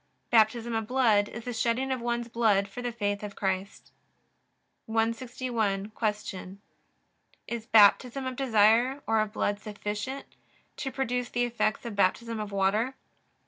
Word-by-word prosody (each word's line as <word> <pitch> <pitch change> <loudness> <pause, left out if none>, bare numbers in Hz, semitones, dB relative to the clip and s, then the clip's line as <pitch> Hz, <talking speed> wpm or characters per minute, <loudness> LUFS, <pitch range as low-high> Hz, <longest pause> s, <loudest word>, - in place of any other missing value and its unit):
Baptism 230 +1 +3
of 225 -1 -2
blood 225 -5 +3
is 235 - -8
the 245 - -3
shedding 235 +4 0
of 260 -2 -1
one's 240 0 -2
blood 220 -4 +2
for 200 +5 -8
the 245 0 -2
faith 205 -3 -2
of 205 -1 -7
Christ. 190 0 -3 1.0
161. 225 -2 -1
Q. 210 -4 -3 0.9
Is 235 -1 -5
Baptism 240 +5 +5
of 260 0 -3
desire 240 +2 +3
or 225 0 +2
of 215 -1 0
blood 205 -1 -1
sufficient 210 +5 -5 0.5
to 270 - -3
produce 250 -2 -2
the 245 - 0
effects 235 -2 -1
of 230 -3 -5
Baptism 225 +4 +1
of 210 -1 -5
water? 205 +6 +1
225 Hz, 145 wpm, -28 LUFS, 210-245 Hz, 1.0 s, Baptism